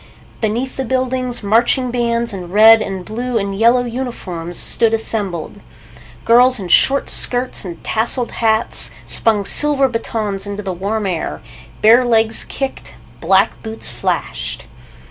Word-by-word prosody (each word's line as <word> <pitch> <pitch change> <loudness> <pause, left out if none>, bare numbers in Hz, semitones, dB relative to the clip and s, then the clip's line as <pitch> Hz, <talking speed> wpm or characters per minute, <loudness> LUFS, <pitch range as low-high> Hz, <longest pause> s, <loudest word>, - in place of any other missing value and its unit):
Beneath 235 +4 -3
the 265 - -2
buildings, 255 -1 -2
marching 240 +4 +1
bands 235 -2 -1
in 180 -3 -8
red 220 +2 +6
and 190 -3 -5
blue 240 +2 -3
and 200 -2 -3
yellow 235 +4 +3
uniforms 215 -9 -6
stood 225 -1 +1
assembled. 205 -4 -3 0.6
Girls 250 +1 +4
in 185 -3 -7
short 275 +10 +3
skirts 250 +1 +2
and 170 -2 -9
tasseled 235 +2 0
hats 220 0 0 0.2
spun 210 -3 +3
silver 290 +1 +4
batons 215 -4 -4
into 205 +1 -6
the 190 -2 -4
warm 205 +4 -3
air. 180 -4 -4 0.4
Bare 230 +4 +6
legs 225 -2 +1
kicked. 270 -1 -6 0.2
Black - - +1
boots 220 0 -4
flashed. - - -4
225 Hz, 135 wpm, -16 LUFS, 205-245 Hz, 0.6 s, red